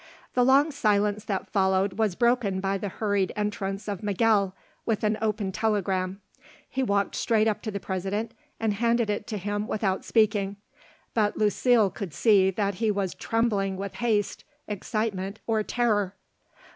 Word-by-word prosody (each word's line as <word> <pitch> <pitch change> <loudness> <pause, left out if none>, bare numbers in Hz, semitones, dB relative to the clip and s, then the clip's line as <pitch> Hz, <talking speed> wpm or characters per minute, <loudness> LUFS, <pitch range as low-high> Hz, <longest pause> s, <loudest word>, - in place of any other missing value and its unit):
The 250 - +3
long 275 +5 +5
silence 210 -5 +1
that 195 -3 -3
followed 190 -1 +2
was 215 -5 +1
broken 235 -5 +2
by 195 +1 -1
the 205 - -3
hurried 200 -1 0
entrance 205 -1 -3
of 200 -3 -3
Miguel 205 -2 +2 0.3
with 220 -2 -1
an 215 0 +2
opened 210 -3 -1
telegram. 195 -3 0 0.5
He 265 - -2
walked 200 -5 +1
straight 220 -2 +2
up 215 - 0
to 225 - -4
the 200 -1 -3
President 195 +4 -3 0.3
and 220 -2 +1
handed 230 +1 +1
it 205 0 -3
to 215 - -3
him 205 +2 -2
without 195 -3 -1
speaking; 210 -3 +2 0.6
but 210 -2 +1
Lucile 215 0 +3
could 185 -7 -6
see 200 -4 +5
that 200 +1 -1
he 225 - +3
was 200 -3 -1
trembling 205 -4 0
with 195 +1 -5
haste, 220 -4 0 0.2
excitement, 210 -1 -3
or 220 -1 +1
terror. 210 -4 0
205 Hz, 160 wpm, -27 LUFS, 195-220 Hz, 0.6 s, long